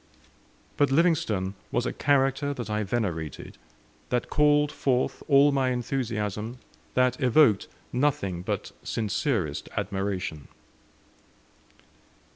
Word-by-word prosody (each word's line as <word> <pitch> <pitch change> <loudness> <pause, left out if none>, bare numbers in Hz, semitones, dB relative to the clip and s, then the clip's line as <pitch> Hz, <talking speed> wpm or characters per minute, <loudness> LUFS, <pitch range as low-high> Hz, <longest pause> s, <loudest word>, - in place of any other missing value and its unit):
But 145 -2 +3
Livingstone 135 - +2 0.2
was 120 - 0
a - - -2
character 140 0 +1
that 120 -4 -5
I 105 0 0
venerated, 90 - -3 0.5
that 125 -1 -1
called 150 0 +4
forth 130 -2 0
all 140 0 +6
my 135 -2 +1
enthusiasm, 115 -3 -2 0.4
that 125 0 +2
evoked 125 -4 +4 0.3
nothing 120 -10 0
but 105 +1 -3
sincerest 105 - -2
admiration. 95 -6 -3
120 Hz, 95 wpm, -27 LUFS, 100-140 Hz, 0.5 s, all